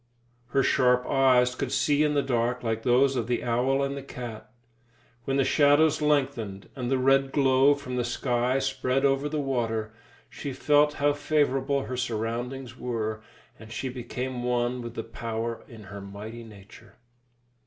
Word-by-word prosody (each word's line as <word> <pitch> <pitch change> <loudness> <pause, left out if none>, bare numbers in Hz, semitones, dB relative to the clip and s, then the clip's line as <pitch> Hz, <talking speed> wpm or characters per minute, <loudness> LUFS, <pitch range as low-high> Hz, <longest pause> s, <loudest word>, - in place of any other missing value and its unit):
Her 135 +2 +1
sharp 125 -1 +3
eyes 130 -2 +3
could - - -4
see 145 0 +2
in 150 -1 +2
the 140 - +2
dark 125 -1 -1
like 115 -1 -1
those 130 +3 +3
of 120 -3 -1
the 120 -1 -1
owl 125 +3 +1
and 140 0 -2
the 140 - -5
cat. 120 -5 -8 0.8
When 135 0 0
the 135 - +3
shadows 145 +3 +4
lengthened, 135 -9 -1
and 125 -3 -3
the 135 - +2
red 135 +1 +3
glow 135 0 +4
from 125 -3 -6
the 125 - +1
sky 120 +1 0
spread 135 0 0
over 140 +1 +1
the 155 0 -2
water, 115 -5 -2 0.3
she 140 -2 -6
felt 150 +2 +3
how 145 0 +2
favourable 140 -2 0
her 125 - -5
surroundings 120 +2 -3
were, 110 -4 -3 0.4
and 110 0 -12
she 130 +2 -3
became 125 0 -5
one 125 0 0
with 120 0 -8
the 115 - -3
power 115 0 -4
in 115 -3 -12
her 100 +1 -9
mighty 105 +4 -8
nature. 105 -2 -15
125 Hz, 165 wpm, -27 LUFS, 115-135 Hz, 0.8 s, shadows